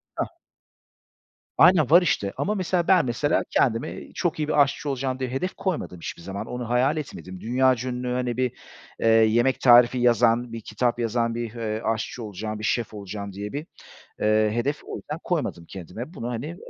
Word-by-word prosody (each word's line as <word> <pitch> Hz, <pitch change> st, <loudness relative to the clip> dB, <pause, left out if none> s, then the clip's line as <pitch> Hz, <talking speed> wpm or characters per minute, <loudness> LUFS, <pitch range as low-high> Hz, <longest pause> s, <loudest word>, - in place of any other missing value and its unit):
Hah. -, -, -1 dB, 1.3 s
Aynen, 165 Hz, -6 st, +6 dB
var 175 Hz, +3 st, +8 dB
işte. 100 Hz, -, 0 dB
Ama, 210 Hz, -, -1 dB
mesela, 180 Hz, -3 st, 0 dB
ben 190 Hz, -, +5 dB
mesela 125 Hz, +5 st, +1 dB
kendime 115 Hz, -2 st, 0 dB
"Çok 175 Hz, -2 st, -1 dB
iyi 150 Hz, -1 st, -1 dB
bir 150 Hz, -1 st, +5 dB
aşçı 140 Hz, +1 st, -2 dB
olacağım." 130 Hz, -1 st, -2 dB
diye 130 Hz, -2 st, -3 dB
hedef 135 Hz, +9 st, -2 dB
koymadım 180 Hz, -, -3 dB
hiçbir 85 Hz, -, -7 dB
zaman. 95 Hz, +3 st, -5 dB
Onu 125 Hz, -1 st, -5 dB
hayal 125 Hz, +5 st, +2 dB
etmedim. 95 Hz, -11 st, -7 dB
Dünyaca 130 Hz, +1 st, +1 dB
ünlü, 125 Hz, 0 st, -4 dB
hani, 125 Hz, -1 st, -1 dB
bir, 125 Hz, -1 st, 0 dB, 0.5 s
eee, -, -, 0 dB
yemek 115 Hz, +3 st, +4 dB
tarifi 120 Hz, 0 st, +6 dB
yazan, 120 Hz, 0 st, +3 dB
bir 115 Hz, -, -5 dB
kitap 120 Hz, +3 st, -1 dB
yazan, 115 Hz, 0 st, 0 dB
bir, 120 Hz, -1 st, -4 dB
eee, 110 Hz, -2 st, -3 dB
aşçı 115 Hz, +2 st, -2 dB
olacağım, 105 Hz, +1 st, -5 dB
bir 105 Hz, -, -7 dB
şef 115 Hz, 0 st, -1 dB
olacağım 100 Hz, 0 st, -6 dB
diye 100 Hz, +2 st, -6 dB
bir, 150 Hz, +3 st, -5 dB, 0.5 s
eee, 110 Hz, 0 st, +3 dB
hedef 140 Hz, +5 st, -1 dB
o -, -, -6 dB
yüzden 150 Hz, +2 st, -6 dB
koymadım 150 Hz, -, -2 dB
kendime. 100 Hz, -, -8 dB
Bunu, 115 Hz, -, -5 dB
hani, 120 Hz, +3 st, -4 dB
eee, 170 Hz, +2 st, -7 dB
120 Hz, 185 wpm, -25 LUFS, 110-135 Hz, 1.3 s, var